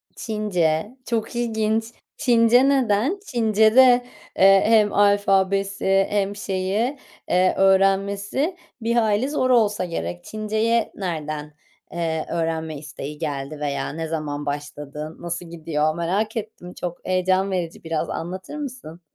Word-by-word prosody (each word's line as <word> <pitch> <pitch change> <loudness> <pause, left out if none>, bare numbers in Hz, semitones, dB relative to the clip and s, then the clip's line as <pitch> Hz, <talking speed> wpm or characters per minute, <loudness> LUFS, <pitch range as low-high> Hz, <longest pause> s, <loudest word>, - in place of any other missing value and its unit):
Çince, 205 -1 -1
çok 230 -1 -2
ilginç. 220 -2 0 0.3
Çince 245 0 +4
neden? 265 - +2
Çincede, 240 - +4 0.3
eee, 195 0 +6
hem 215 -2 +4
alfabesi 195 -1 +2
hem 200 -1 0
şeyi, 200 +7 -1 0.3
eee, 185 +1 +3
öğrenmesi 195 - +2 0.3
bir 230 +1 0
hayli 220 +2 +2
zor 255 -3 0
olsa 210 -6 +3
gerek. 175 0 -5
Çinceye 220 +2 0
nereden, 155 -5 -4 0.4
eee, 160 -2 -2
öğrenme 160 -2 -2
isteği 145 0 -8
geldi 145 -1 -4
veya 145 -1 -2
ne 160 0 -4
zaman 150 -2 -4
başladı, 145 +1 -6
nasıl 175 +1 -5
gidiyor 155 -2 -1
merak 200 +7 -1
ettim. 205 -5 -7
Çok 175 -1 -6
heyecan 185 +1 +1
verici, 175 -3 -3
biraz 165 -1 -2
anlatır 185 - -5
mısın? 250 - -7
195 Hz, 120 wpm, -23 LUFS, 165-220 Hz, 0.4 s, eee